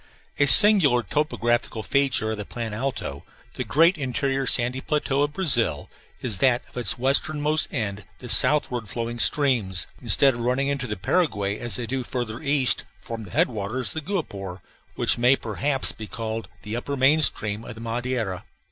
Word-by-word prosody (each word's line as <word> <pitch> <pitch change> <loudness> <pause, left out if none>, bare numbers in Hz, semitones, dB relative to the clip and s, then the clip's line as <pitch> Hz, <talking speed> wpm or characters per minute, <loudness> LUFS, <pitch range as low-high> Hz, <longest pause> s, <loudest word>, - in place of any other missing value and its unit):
A 140 - +4
singular 165 - +6
topographical 120 -7 -1
feature 135 -5 0
of 110 - -4
the - - -4
Plan 115 +1 -6
Alto, 130 +5 -4 0.3
the - - -4
great 165 +3 +3
interior 135 0 -2
sandy 125 +2 +1
plateau 140 -2 -1
of 145 0 0
Brazil, 120 - +1 0.3
is 110 -7 -2
that 125 -2 +2
at - - -21
its 120 -2 0
westernmost 150 +4 +1
end 105 -5 -3
the 125 - -10
southward 120 -4 +3
flowing 120 +1 -5
streams, 115 -11 +2 0.2
instead 135 -1 +4
of 120 - -8
running 125 +4 0
into 140 -2 -2
the 105 - -4
Paraguay 100 - -1
as 120 - -2
they 125 - -3
do 130 +2 -3
farther 120 -2 -5
east, 140 -3 +2 0.2
form 115 +2 -8
the - - -12
headwaters 110 +5 -1
of 160 - -4
the 185 - -8
Guapore, 95 - -5 0.3
which - - +2
may, 125 +3 +5
perhaps, 135 +4 -2
be 110 - -9
called 110 0 -5
the 105 +1 -5
upper 140 +4 -4
main 140 +4 +4
stream 110 -6 +2
of 120 - -9
the 110 - -11
Madeira. 115 -4 -3
125 Hz, 175 wpm, -24 LUFS, 110-140 Hz, 0.3 s, singular